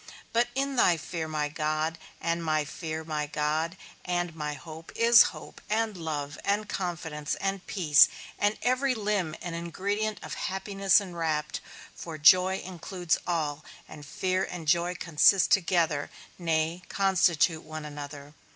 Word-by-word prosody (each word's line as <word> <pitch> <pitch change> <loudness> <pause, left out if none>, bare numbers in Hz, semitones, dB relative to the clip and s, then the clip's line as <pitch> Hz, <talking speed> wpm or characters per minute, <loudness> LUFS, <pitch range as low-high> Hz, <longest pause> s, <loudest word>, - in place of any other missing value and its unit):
But 235 +1 +3
in 275 0 -1
thy 175 -7 +5
fear, 160 0 -5
my 155 -1 -1
God, 155 +1 -2 0.2
and 170 0 -1
my 155 -2 +1
fear, 160 +1 -5
my 150 -2 -3
God, 155 +4 -1 0.3
and 175 -2 -2
my 150 -2 -3
hope, 160 +2 -10
is 230 0 +7
hope, - - -12
and 220 0 0
love, 150 -4 -4
and 205 +1 0
confidence, 165 -6 -3
and 195 -1 -2
peace, 155 -7 +5 0.3
and 205 +1 +1
every 255 +2 +2
limb 205 -7 -1
and 175 -1 -4
ingredient 200 +6 -2
of - - -6
happiness 195 +1 +1
enwrapped; 165 -5 -2 0.3
for 165 -2 -7
joy 185 +5 +6
includes 180 -1 -2
all, 155 -4 -1 0.2
and 150 -1 -11
fear 185 +5 -1
and 170 -4 -6
joy 175 +2 +2
consist 175 +3 +4
together, 170 -5 +2 0.3
nay, 165 0 0
constitute 175 -4 +2
one 155 0 -7
another. 145 0 -8
170 Hz, 140 wpm, -28 LUFS, 155-190 Hz, 0.3 s, is